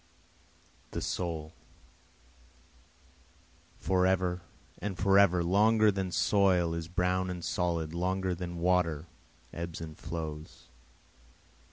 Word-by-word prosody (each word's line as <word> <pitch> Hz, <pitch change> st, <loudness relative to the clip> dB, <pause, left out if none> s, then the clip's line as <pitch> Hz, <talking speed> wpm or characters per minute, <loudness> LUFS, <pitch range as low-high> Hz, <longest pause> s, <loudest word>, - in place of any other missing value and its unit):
6 -, -, -22 dB
The -, -, -3 dB
soul, 80 Hz, -3 st, -3 dB, 2.2 s
Forever 90 Hz, -1 st, +1 dB, 0.4 s
and 100 Hz, -3 st, -4 dB
forever 95 Hz, -1 st, +4 dB
longer 105 Hz, +4 st, +4 dB
than 95 Hz, -2 st, -3 dB
soil 90 Hz, -4 st, +3 dB
is 85 Hz, -1 st, -4 dB
brown 90 Hz, +1 st, 0 dB
and 90 Hz, -2 st, -5 dB
solid 85 Hz, -2 st, -1 dB
longer 95 Hz, +1 st, -1 dB
than 85 Hz, 0 st, -5 dB
water 85 Hz, -3 st, +1 dB, 0.5 s
ebbs 85 Hz, -1 st, -5 dB
and 80 Hz, -2 st, -7 dB
flows. 80 Hz, -2 st, -7 dB
90 Hz, 95 wpm, -30 LUFS, 85-95 Hz, 2.2 s, forever